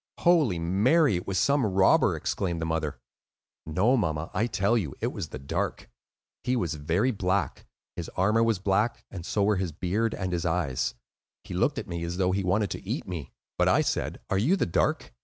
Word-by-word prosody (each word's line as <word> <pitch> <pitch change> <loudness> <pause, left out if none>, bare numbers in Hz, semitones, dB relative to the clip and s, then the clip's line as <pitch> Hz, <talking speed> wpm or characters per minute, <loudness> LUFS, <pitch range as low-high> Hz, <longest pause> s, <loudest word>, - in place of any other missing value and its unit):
"Holy 155 - +4
Mary! 105 - +3
it 90 - -7
was 95 - -1
some 140 - +3
robber," 95 -3 +4
exclaimed 85 -4 -2
the 80 - -2
mother. 80 -2 -2 0.7
"No, 95 +11 +3
mamma, 80 -8 -1
I 110 +5 +1
tell 105 0 +1
you, 85 - -1
it - - -2
was - - -4
the - - -6
Dark. 70 +1 -3 0.5
He 125 - +1
was 90 -9 -1
very 80 - +1
black; 95 -2 -1 0.3
his 85 - -5
armor 105 +5 +3
was 115 -2 +2
black, 100 +5 0
and 90 -4 -7
so 100 +3 0
were 105 0 +3
his 90 -3 -2
beard 100 +8 -1
and 95 -2 -3
his 85 -1 -1
eyes. 80 -8 -1 0.5
He - - -8
looked - - +1
at - - -4
me 85 0 -4
as 85 +1 -3
though 95 -1 +2
he 95 +1 0
wanted 100 +2 +1
to - - -5
eat - - -4
me. 85 -5 -6 0.3
But - - +4
I - - +4
said, - - -2
'Are 95 - +2
you 145 - +3
the - - +1
Dark? 85 - 0
95 Hz, 205 wpm, -27 LUFS, 85-110 Hz, 0.7 s, Holy